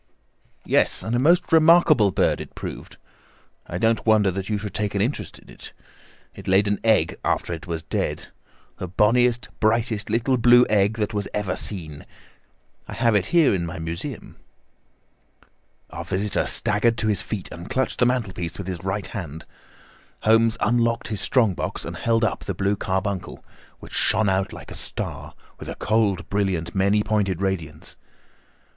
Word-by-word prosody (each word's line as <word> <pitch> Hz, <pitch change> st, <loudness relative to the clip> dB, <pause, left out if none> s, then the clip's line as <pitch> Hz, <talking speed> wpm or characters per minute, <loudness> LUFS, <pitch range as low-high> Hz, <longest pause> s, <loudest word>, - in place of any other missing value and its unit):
"Yes, -, -, +2 dB
and 115 Hz, -, -2 dB
a -, -, +2 dB
most 170 Hz, +7 st, +3 dB
remarkable 160 Hz, -8 st, +6 dB
bird -, -, +1 dB
it -, -, -10 dB
proved. -, -, -8 dB, 0.7 s
I 85 Hz, -, -4 dB
don't 115 Hz, +3 st, +1 dB
wonder 110 Hz, -3 st, +4 dB
that 95 Hz, +2 st, -5 dB
you 105 Hz, -, 0 dB
should 105 Hz, 0 st, -6 dB
take 105 Hz, -1 st, -2 dB
an 100 Hz, -, +1 dB
interest 110 Hz, -, -2 dB
in -, -, -19 dB
it. -, -, -12 dB, 0.6 s
It -, -, -11 dB
laid 95 Hz, +2 st, +3 dB
an 100 Hz, 0 st, 0 dB
egg 110 Hz, -1 st, +2 dB
after -, -, -1 dB
it 80 Hz, +2 st, -8 dB
was 80 Hz, -2 st, -4 dB
dead—the 90 Hz, +3 st, -6 dB
bonniest, 120 Hz, +6 st, +2 dB
brightest 110 Hz, -1 st, +1 dB
little 120 Hz, +4 st, +1 dB
blue 120 Hz, +1 st, +6 dB
egg 105 Hz, +1 st, +3 dB
that 110 Hz, 0 st, -2 dB, 0.2 s
ever 105 Hz, -3 st, -1 dB
was -, -, -1 dB
seen. 80 Hz, -8 st, -5 dB, 0.8 s
I -, -, -7 dB
have 115 Hz, -1 st, +2 dB
it 105 Hz, -3 st, +2 dB
here 170 Hz, -8 st, +4 dB
in 90 Hz, -3 st, -1 dB
my 85 Hz, +2 st, -5 dB
museum." 80 Hz, +1 st, -6 dB, 1.5 s
Our -, -, -6 dB
visitor 100 Hz, +1 st, -1 dB
staggered 115 Hz, +3 st, +1 dB
to 110 Hz, -, 0 dB
his 105 Hz, -4 st, +2 dB
feet 105 Hz, -4 st, -5 dB
and 85 Hz, +1 st, -9 dB
clutched 130 Hz, 0 st, -1 dB
the 125 Hz, -, +4 dB
mantelpiece 95 Hz, -9 st, -2 dB
with 100 Hz, -, -6 dB
his 90 Hz, -1 st, -5 dB
right 95 Hz, +1 st, -2 dB
hand. 80 Hz, -6 st, -7 dB, 0.8 s
Holmes 115 Hz, +1 st, +3 dB
unlocked 115 Hz, -1 st, +1 dB
his 105 Hz, -4 st, -3 dB
strong 115 Hz, -7 st, +2 dB
box -, -, -4 dB
and -, -, -6 dB
held 115 Hz, 0 st, +1 dB
up 110 Hz, -, -1 dB
the 100 Hz, -, -3 dB
blue 100 Hz, +3 st, 0 dB
carbuncle, 95 Hz, 0 st, -3 dB, 0.3 s
which -, -, -12 dB
shone 110 Hz, -1 st, +2 dB
out 95 Hz, 0 st, 0 dB
like -, -, -10 dB
a -, -, -6 dB
star, -, -, -6 dB, 0.2 s
with -, -, -8 dB
a -, -, -5 dB
cold, 105 Hz, -5 st, 0 dB
brilliant, 95 Hz, -5 st, -1 dB
many 100 Hz, +2 st, +2 dB
pointed 105 Hz, -5 st, 0 dB
radiance. 85 Hz, -6 st, -3 dB
105 Hz, 170 wpm, -23 LUFS, 95-115 Hz, 1.5 s, remarkable